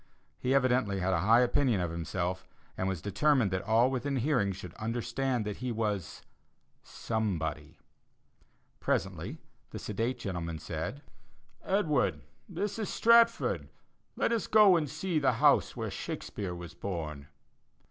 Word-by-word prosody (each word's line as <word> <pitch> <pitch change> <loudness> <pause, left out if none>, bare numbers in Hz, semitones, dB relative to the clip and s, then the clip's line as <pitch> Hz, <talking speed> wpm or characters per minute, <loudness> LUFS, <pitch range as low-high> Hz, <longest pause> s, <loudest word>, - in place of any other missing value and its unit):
He 130 +2 +1
evidently 125 -6 +2
had 95 +1 0
a 85 - +2
high 110 +7 +5
opinion 125 -3 +2
of 90 -2 -1
himself, 85 +2 -3 0.3
and 95 - -2
was 95 -4 -3
determined 125 0 +2
that 95 0 -1
all 115 +4 +3
within 135 +2 -2
hearing 125 -6 +1
should 90 -2 -8
understand 120 +2 -2
that 105 -1 -4
he 125 0 -3
was 105 -6 -3 0.6
somebody. 95 -9 -3 1.0
Presently - - -2 0.3
the - - -7
sedate 115 +5 -2
gentleman 85 -4 -4
said: - - -5 0.6
"Edward, 150 - +1 0.3
this 205 +1 -3
is 215 - -2
Stratford. 230 0 +4 0.5
Let - - +1
us 230 -2 0
go 210 -4 +7
and 155 -4 0
see 160 +2 -1
the 140 - +3
house - - +3
where - - -3
Shakespeare 95 -4 -5
was 85 -1 -8
born." 75 -7 -5
115 Hz, 135 wpm, -30 LUFS, 95-135 Hz, 1.0 s, go